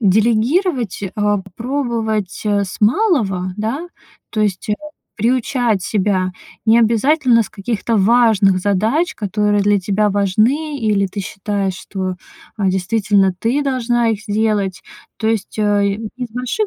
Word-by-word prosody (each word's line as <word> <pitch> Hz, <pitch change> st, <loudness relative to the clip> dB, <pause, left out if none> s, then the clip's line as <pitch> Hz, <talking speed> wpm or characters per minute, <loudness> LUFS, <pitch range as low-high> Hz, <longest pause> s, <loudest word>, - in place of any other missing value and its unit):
Делегировать, 235 Hz, -, +1 dB
а 205 Hz, -1 st, +1 dB
попробовать, 220 Hz, -1 st, -3 dB
а, 205 Hz, -1 st, +2 dB
с 185 Hz, -, -9 dB
малого, 210 Hz, -, +2 dB
да, 255 Hz, +11 st, -3 dB, 0.4 s
то 215 Hz, -, -2 dB
есть, 205 Hz, -1 st, -1 dB
а, 210 Hz, -, +3 dB, 0.4 s
приучать 235 Hz, -2 st, +1 dB
себя. 185 Hz, -2 st, 0 dB, 0.4 s
Не 225 Hz, +1 st, +6 dB
обязательно 235 Hz, +2 st, +3 dB
с -, -, -10 dB
каких-то 225 Hz, +2 st, -2 dB
важных 210 Hz, -2 st, +4 dB
задач, 220 Hz, -, +1 dB
которые 205 Hz, 0 st, 0 dB
для 205 Hz, 0 st, +3 dB
тебя 205 Hz, +2 st, +1 dB
важны, 230 Hz, +10 st, +1 dB
или 210 Hz, -4 st, +1 dB
ты 200 Hz, +2 st, -5 dB
считаешь, 195 Hz, 0 st, -3 dB
что, 185 Hz, -1 st, -5 dB, 0.4 s
а, 195 Hz, -3 st, +1 dB
действительно 195 Hz, +1 st, +2 dB
ты 250 Hz, +8 st, 0 dB
должна 240 Hz, -3 st, +1 dB
их 210 Hz, -2 st, -1 dB
сделать. 205 Hz, -2 st, 0 dB, 0.4 s
То 220 Hz, -, 0 dB
есть, 220 Hz, -2 st, -2 dB
э, 205 Hz, -1 st, +2 dB, 0.2 s
не 250 Hz, -, -4 dB
с 230 Hz, -, -29 dB
больших 250 Hz, -, -1 dB
215 Hz, 135 wpm, -18 LUFS, 200-235 Hz, 0.4 s, Не